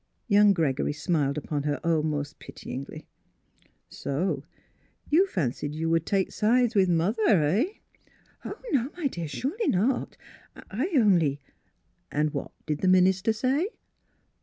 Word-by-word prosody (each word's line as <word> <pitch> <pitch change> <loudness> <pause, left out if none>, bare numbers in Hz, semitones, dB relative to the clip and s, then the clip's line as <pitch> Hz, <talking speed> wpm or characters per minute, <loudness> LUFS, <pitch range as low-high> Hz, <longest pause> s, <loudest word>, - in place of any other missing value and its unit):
Young 205 -2 +6
Gregory 145 -5 0
smiled 150 -2 0
upon 150 -1 -2
her 145 0 -1
almost 155 -3 -1
pityingly. 140 +4 -8 0.5
" - - -34 0.2
So 145 0 -2 0.7
you 360 +6 +5
fancied 145 - -2
you 165 +1 -1
would 165 -1 +1
take 195 -2 +1
sides 240 +2 +2
with 195 -4 +3
mother 175 +7 +1
— - - +3 0.2
eh? 190 - +2 0.3
" - - -34
" - - -34
Oh, 410 - -7
no, 265 -3 +1
my 345 - -4
dear; 170 - -2
surely 305 - -3
not! 235 +8 0 0.4
I 255 - -4
only 175 - +3 0.2
— - - -43
" - - -44
" - - -45
And 150 0 0
what - - -4 0.2
did 150 -2 -2
the 185 - +1
minister 185 +3 +4
say? 265 - 0
180 Hz, 160 wpm, -27 LUFS, 150-225 Hz, 0.7 s, Young